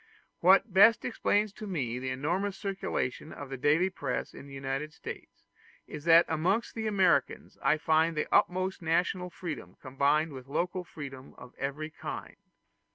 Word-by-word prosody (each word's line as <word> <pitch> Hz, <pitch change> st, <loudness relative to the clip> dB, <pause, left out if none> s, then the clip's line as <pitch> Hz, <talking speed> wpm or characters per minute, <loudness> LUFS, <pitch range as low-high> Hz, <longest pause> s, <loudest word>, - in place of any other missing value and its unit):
What 190 Hz, +3 st, +5 dB
best 215 Hz, +4 st, +6 dB
explains 210 Hz, -3 st, +1 dB
to 215 Hz, -, -8 dB
me 125 Hz, -10 st, -2 dB
the 130 Hz, 0 st, -3 dB
enormous 175 Hz, +10 st, -1 dB
circulation 195 Hz, -, -3 dB
of 140 Hz, -1 st, -9 dB
the -, -, -3 dB
daily 155 Hz, +8 st, +3 dB
press -, -, -3 dB
in 140 Hz, -, -11 dB
the 140 Hz, -, -12 dB
United 135 Hz, +3 st, -3 dB
States, -, -, -9 dB, 0.4 s
is 150 Hz, 0 st, -9 dB
that 165 Hz, 0 st, +7 dB
amongst 180 Hz, +8 st, 0 dB
the 220 Hz, -1 st, -3 dB
Americans 195 Hz, -3 st, +1 dB
I 155 Hz, -, +3 dB
find 160 Hz, +1 st, +2 dB
the 150 Hz, -, +1 dB
utmost 185 Hz, +1 st, +2 dB
national 180 Hz, +2 st, 0 dB
freedom 155 Hz, -, -7 dB
combined 145 Hz, +3 st, +1 dB
with 130 Hz, -1 st, -9 dB
local 180 Hz, +5 st, -2 dB
freedom 135 Hz, -6 st, -9 dB
of 125 Hz, 0 st, -12 dB
every 145 Hz, +3 st, -3 dB
kind. -, -, -7 dB
160 Hz, 160 wpm, -30 LUFS, 140-190 Hz, 0.4 s, that